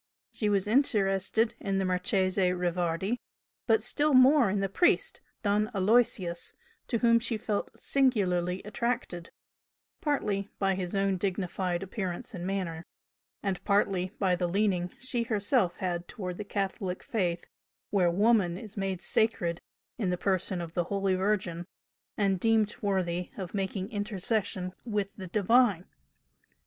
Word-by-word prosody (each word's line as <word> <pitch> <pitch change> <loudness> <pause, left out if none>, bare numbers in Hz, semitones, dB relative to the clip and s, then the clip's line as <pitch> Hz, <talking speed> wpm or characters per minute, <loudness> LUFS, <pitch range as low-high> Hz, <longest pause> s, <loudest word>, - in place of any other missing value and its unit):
She 210 - 0
was 200 -1 +1
interested 220 -3 +2
in 195 -1 -1
the 195 - +1
Marchese 185 +1 +1
Rivardi, 180 +5 -1 0.5
but 445 - +3
still 295 -1 +2
more 260 +1 +7
so 195 - 0
in - - +1
the 195 - +1
priest, 355 - +2 0.2
Don 210 +1 +2
Aloysius, 195 -4 +2 0.3
to 235 - 0
whom 230 0 +4
she 230 -1 -2
felt 210 -1 -2
singularly 190 -9 +1
attracted, 210 -5 -3 0.7
partly 210 -9 -1
by 195 -1 +2
his 185 0 -3
own 195 -1 +1
dignified 185 -1 -2
appearance 195 +3 -4
and 180 -1 -5
manner, 180 -4 -3 0.6
and 195 -2 -2
partly 195 -2 +1
by 185 -3 +2
the 175 0 -1
leaning 185 -1 +1
she 255 -1 -2
herself 215 -4 +1
had 175 -2 -2
towards 180 -4 -6
the 210 - -4
Catholic 195 -2 -3
Faith 175 -6 -1 0.5
where 185 -4 +3
"Woman" 195 -1 +3
is 215 +1 -10
made 195 -3 -3
sacred 175 -7 +1 0.4
in 200 -5 0
the 180 - 0
person 185 -1 0
of 165 -1 -7
the 175 -1 0
Holy 195 0 0
Virgin, 185 -3 -1 0.5
and 195 -3 +2
deemed 220 0 +2
worthy 180 -3 -1
of 185 -4 -6
making 195 +1 -3
intercession 205 -3 -2
with 210 -4 -2
the 190 -2 -7
Divine. 210 -1 +3
195 Hz, 140 wpm, -29 LUFS, 180-215 Hz, 0.7 s, more